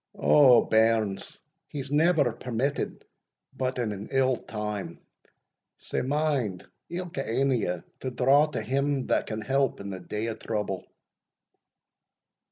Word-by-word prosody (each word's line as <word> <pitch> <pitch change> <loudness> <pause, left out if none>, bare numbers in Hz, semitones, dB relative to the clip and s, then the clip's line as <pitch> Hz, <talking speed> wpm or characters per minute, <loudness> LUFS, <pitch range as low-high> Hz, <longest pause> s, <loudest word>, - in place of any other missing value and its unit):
O, 130 -5 +6
bairns, 110 -3 +1 0.3
he's 140 -2 -6
never 150 -3 +3
permitted 125 +4 -3 0.5
but 130 0 -2
in 120 -4 -1
an 100 +1 -6
ill 130 -1 +3
time, 105 -3 -5 0.8
sae - - -3
mind 135 - -1 0.2
ilka 175 -5 -4
ane 135 +4 +1 0.2
o' 90 - 0
ye - - -12 0.2
to 130 - -3
draw 135 +4 +4
to 150 - -4
Him 140 0 0
that - - +1
can 110 0 -4
help 135 +1 0
in 100 0 -6
the 95 - -5
day 105 +4 -4
of 115 -1 -4
trouble." 105 -4 -3
125 Hz, 135 wpm, -27 LUFS, 110-140 Hz, 0.8 s, O